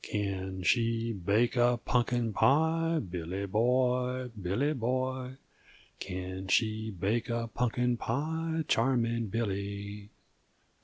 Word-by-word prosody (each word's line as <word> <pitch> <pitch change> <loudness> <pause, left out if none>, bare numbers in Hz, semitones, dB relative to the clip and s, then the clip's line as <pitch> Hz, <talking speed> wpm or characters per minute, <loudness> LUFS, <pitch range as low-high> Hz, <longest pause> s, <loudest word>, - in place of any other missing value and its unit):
"Can 95 -2 -3
she 115 +2 +1
make 115 +5 +3
a 120 0 +4
punkin 120 -2 +1
pie, 160 +5 +3
Billy 90 +3 -4
boy, 125 +4 +1
Billy 115 +7 -1
boy, 130 0 -2 0.6
Can 95 0 -5
she 110 +1 +1
make 110 +6 0
a 115 0 -1
punkin 125 0 +1
pie, 160 +7 -1
charming 115 -1 +1
Billy? 100 -1 -3
115 Hz, 100 wpm, -30 LUFS, 100-125 Hz, 0.6 s, a